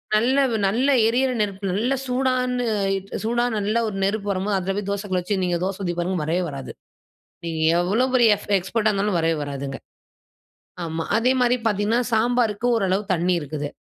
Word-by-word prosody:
நல்ல 250 Hz, +5 st, +2 dB, 0.3 s
நல்ல 250 Hz, +8 st, +1 dB, 0.2 s
எரியிற 255 Hz, +3 st, +2 dB
நெருப்பு 195 Hz, -1 st, -2 dB
நல்ல 235 Hz, +7 st, 0 dB
சூடான 250 Hz, -1 st, 0 dB, 0.6 s
சூடான 240 Hz, +1 st, 0 dB
நல்ல 210 Hz, +3 st, 0 dB
ஒரு 205 Hz, -, -4 dB
நெருப்பு 205 Hz, +1 st, -1 dB
வரும்போது 195 Hz, +1 st, 0 dB
அதில 190 Hz, +1 st, -2 dB
போய் 200 Hz, -1 st, -3 dB
தோசை 200 Hz, +1 st, -2 dB
கல்ல 185 Hz, -1 st, 0 dB
வச்சு 195 Hz, +2 st, -2 dB
நீங்க 175 Hz, -1 st, 0 dB
தோச 195 Hz, 0 st, -3 dB
ஊதி 175 Hz, -1 st, -1 dB
பாருங்க 180 Hz, +1 st, -1 dB
வரவே 170 Hz, +4 st, 0 dB
வராது. 135 Hz, -1 st, -7 dB, 0.7 s
நீங்க 160 Hz, -1 st, -3 dB, 0.2 s
எவ்ளோ 205 Hz, +8 st, +2 dB
பெரிய 240 Hz, -3 st, +5 dB
எஃப் -, -, -13 dB
எக்ஸ்பர்ட்டா 215 Hz, +4 st, 0 dB
இருந்தாலும் 200 Hz, -2 st, 0 dB
வரவே 165 Hz, 0 st, +1 dB
வராதுங்க. 140 Hz, -1 st, -5 dB, 1.1 s
ஆமா. 160 Hz, 0 st, -3 dB
அதே 250 Hz, +3 st, +3 dB
மாரி 245 Hz, 0 st, +3 dB
பார்த்தீங்கன்னா 210 Hz, +3 st, +1 dB
சாம்பாருக்கு 230 Hz, -1 st, +1 dB
ஓரளவு 195 Hz, -2 st, +1 dB
தண்ணீ 180 Hz, +1 st, +1 dB
இருக்குது. 145 Hz, 0 st, -4 dB
205 Hz, 165 wpm, -23 LUFS, 180-235 Hz, 1.1 s, பெரிய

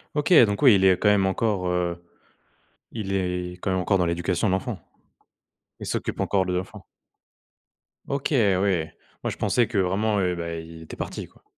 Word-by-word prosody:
OK, 150 Hz, +4 st, +2 dB
donc 100 Hz, -1 st, -3 dB
oui, 130 Hz, -7 st, +7 dB
il 95 Hz, -, +2 dB
est 95 Hz, -1 st, +5 dB
quand 105 Hz, -, +1 dB
même 100 Hz, -2 st, +4 dB
encore, 95 Hz, -1 st, 0 dB
heu, 85 Hz, -1 st, -2 dB, 0.9 s
il 105 Hz, -4 st, -4 dB
est 90 Hz, -2 st, -2 dB
quand 95 Hz, -, -2 dB
même 95 Hz, -, 0 dB
encore 95 Hz, +2 st, +1 dB
dans 90 Hz, -, +1 dB
l'éducation 85 Hz, +4 st, -1 dB
de 95 Hz, -, +1 dB
l'enfant. 95 Hz, -, -2 dB, 1.0 s
Il -, -, -7 dB
s'occupe -, -, -3 dB
encore 95 Hz, -2 st, +1 dB
de 90 Hz, -, -2 dB
l'enfant. 90 Hz, +1 st, -5 dB, 1.2 s
OK 140 Hz, +2 st, -2 dB
oui, 100 Hz, -, +2 dB, 0.4 s
moi -, -, -1 dB
je -, -, -8 dB
pensais 120 Hz, -2 st, +1 dB
que 115 Hz, -3 st, -4 dB
vraiment, 100 Hz, +3 st, +1 dB
heu, 90 Hz, -1 st, 0 dB
bah, 85 Hz, -1 st, -4 dB
il 80 Hz, 0 st, -9 dB
était -, -, -10 dB
parti, -, -, -6 dB
quoi. -, -, -26 dB
95 Hz, 185 wpm, -24 LUFS, 90-105 Hz, 1.2 s, oui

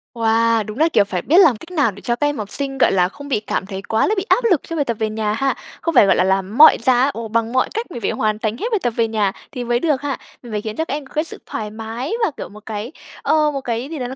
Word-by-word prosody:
Wow, 230 Hz, 0 st, +2 dB
đúng 215 Hz, -, -7 dB
là, 320 Hz, +2 st, +4 dB
kiểu, 205 Hz, -, +5 dB
phải 190 Hz, -3 st, -3 dB
biết 330 Hz, +5 st, +3 dB
làm 315 Hz, -, +6 dB
cách 330 Hz, +11 st, -12 dB
nào 290 Hz, -10 st, +2 dB
để 200 Hz, +1 st, -13 dB
cho 240 Hz, -, 0 dB
các 290 Hz, +4 st, 0 dB
em 290 Hz, -1 st, -2 dB
học 210 Hz, -1 st, -5 dB
sinh, 275 Hz, -1 st, -3 dB
gọi -, -, +4 dB
là, 180 Hz, -1 st, +2 dB
không 285 Hz, +8 st, -11 dB
bị 265 Hz, -6 st, 0 dB
cảm 210 Hz, -2 st, -3 dB
thấy 195 Hz, -1 st, -6 dB
quá 220 Hz, +2 st, +1 dB
là 430 Hz, -, +1 dB
bị 380 Hz, -, -1 dB
áp -, -, +3 dB
lực 335 Hz, -, +3 dB
cho 330 Hz, -, -6 dB
bài 290 Hz, -3 st, 0 dB
tập 235 Hz, -3 st, -2 dB
về 220 Hz, -, 0 dB
nhà 215 Hz, -1 st, -1 dB
ha. 270 Hz, +5 st, 0 dB, 0.3 s
Không 335 Hz, -2 st, -2 dB
phải, 210 Hz, -, +8 dB
gọi 190 Hz, -, +4 dB
là, 180 Hz, -, +3 dB
làm 190 Hz, +3 st, 0 dB
mọi 310 Hz, -, +9 dB
giá, 255 Hz, +2 st, +4 dB
ồ, 230 Hz, 0 st, -5 dB
bằng 230 Hz, +1 st, -1 dB
mọi 260 Hz, -, +2 dB
cách 450 Hz, -3 st, -4 dB
mình 240 Hz, -, -6 dB
phải -, -, 0 dB
hoàn 215 Hz, -1 st, -1 dB
thành 220 Hz, 0 st, -2 dB
hết -, -, -4 dB
bài 430 Hz, -, +2 dB
tập -, -, +2 dB
về 230 Hz, -, +2 dB
nhà 210 Hz, -3 st, 0 dB, 0.2 s
thì 250 Hz, -3 st, -5 dB
mới 240 Hz, 0 st, +1 dB
được 295 Hz, -2 st, 0 dB
ha. 285 Hz, -3 st, -2 dB, 0.3 s
Mình 240 Hz, -, -10 dB
phải 210 Hz, -, -1 dB
khiến 215 Hz, 0 st, -5 dB
cho 320 Hz, -, -1 dB
các 280 Hz, -, -4 dB
em 290 Hz, -1 st, -4 dB
có -, -, -18 dB
cái 310 Hz, +1 st, +1 dB
sự -, -, -8 dB
thoải 210 Hz, -1 st, -5 dB
mái 225 Hz, -, -5 dB
và, 355 Hz, -, -1 dB
kiểu, -, -, -6 dB
một 210 Hz, +1 st, -14 dB
cái, 220 Hz, +3 st, -5 dB, 0.3 s
ờ, 305 Hz, -1 st, +2 dB
một 275 Hz, -2 st, -4 dB
cái 240 Hz, +2 st, -3 dB
gì 315 Hz, -3 st, -5 dB
đó 245 Hz, -, -3 dB
nó 260 Hz, -, -7 dB
235 Hz, 325 wpm, -20 LUFS, 215-285 Hz, 0.3 s, mọi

